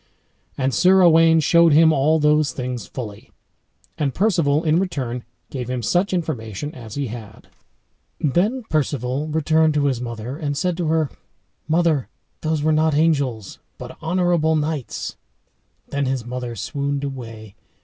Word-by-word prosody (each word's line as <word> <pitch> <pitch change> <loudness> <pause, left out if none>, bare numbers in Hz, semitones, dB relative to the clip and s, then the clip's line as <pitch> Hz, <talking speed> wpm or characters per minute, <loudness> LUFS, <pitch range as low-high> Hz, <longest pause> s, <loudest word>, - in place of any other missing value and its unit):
And 130 -1 0
Sir 185 +5 +5
Owain 165 -1 +6
showed 170 +1 +5
him 160 +1 +6
all 150 +3 +3
those 150 -1 +2
things 125 -4 -5
fully. 105 -6 -8 0.7
And 140 -4 -1
Perceval 165 -7 +2
in 160 +1 +3
return 130 -10 -3 0.3
gave 125 -3 -5
him 125 -2 -3
such 180 - +1
information 145 - -3
as 115 -4 -9
he 140 - -2
had 110 -2 -10 0.7
Then 200 - +1
Perceval 145 - -1
returned 155 0 +2
to 145 -1 +2
his 130 -4 0
mother, 120 +2 -5
and 145 -3 -3
said 180 +3 0
to 175 -3 -1
her, 160 -2 +1 0.6
"Mother, 160 -4 +1 0.3
those 155 -2 -1
were 155 - +3
not 155 -1 +2
angels, 140 -9 0 0.2
but - - -9
honorable 170 -1 +1
knights." 150 -3 -3 0.7
Then 140 -1 -1
his 130 -3 -2
mother 125 -1 -5
swooned 140 +3 -3
away. 115 -6 -7
145 Hz, 145 wpm, -21 LUFS, 125-160 Hz, 0.7 s, Owain